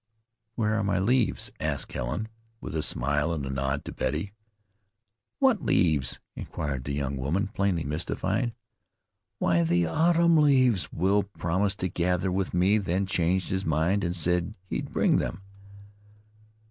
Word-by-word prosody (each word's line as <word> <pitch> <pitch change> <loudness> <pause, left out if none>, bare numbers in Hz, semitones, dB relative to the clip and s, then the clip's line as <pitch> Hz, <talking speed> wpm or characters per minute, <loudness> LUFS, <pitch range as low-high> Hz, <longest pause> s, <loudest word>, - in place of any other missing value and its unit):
"Where 110 -2 +1
are 110 -1 0
my 100 -1 +1
leaves?" 120 +5 +1
asked - - -2
Helen, - - -3 0.3
with - - -7
a 80 - 0
smile 75 +4 +1
and 75 -4 -2
a 65 - -4
nod 70 +1 -2
to - - -5
Betty. 80 +7 -2 1.0
"What 265 -7 +3
leaves?" 75 -8 +2 0.2
inquired 70 -3 -4
that 70 - -3
young 70 -1 -2
woman, 85 +10 -1
plainly 100 -5 0
mystified. 95 - -2 0.8
"Why, 85 -1 +2
the 85 +1 +2
autumn 170 - +3
leaves 130 - +3
Will 95 +4 +2
promised 95 +1 -1
to 95 - +1
gather 90 +1 0
with 95 0 -1
me, 95 +5 +3
then 95 0 0
changed 90 0 0
his 95 0 -1
mind, 80 +6 +1
and 85 0 -1
said 90 +4 0
he'd - - -4
bring - - +3
them." 95 +3 -3
90 Hz, 145 wpm, -27 LUFS, 80-100 Hz, 1.0 s, What